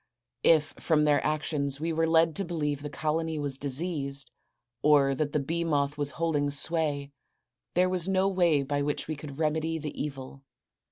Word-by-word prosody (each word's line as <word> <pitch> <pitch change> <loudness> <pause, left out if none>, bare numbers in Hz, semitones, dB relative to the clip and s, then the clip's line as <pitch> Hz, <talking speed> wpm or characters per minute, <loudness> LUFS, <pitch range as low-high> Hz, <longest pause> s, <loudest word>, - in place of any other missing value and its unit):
If 155 -2 +4
from 155 -2 +2
their 150 -1 +3
actions 145 -2 -1
we 165 +1 -1
were 165 +1 +1
led 160 -1 +3
to 200 - 0
believe 150 -5 -2
the 145 - -5
colony 160 +2 -2
was 140 -2 -3
diseased, 140 -2 -2 0.5
or 145 -1 +4
that 145 +2 -1
the 150 - +1
bee 165 +5 -2
moth 145 -3 0
was 145 -1 0
holding 155 -3 +1
sway, 145 -1 0 0.6
there 180 +1 +4
was 185 -1 +1
no 190 0 +2
way 175 -7 +2
by 145 +1 -1
which 145 0 -2
we 155 - -3
could 145 -1 -9
remedy 160 +1 0
the 150 -2 -5
evil. 135 -2 -6
150 Hz, 175 wpm, -28 LUFS, 145-165 Hz, 0.6 s, If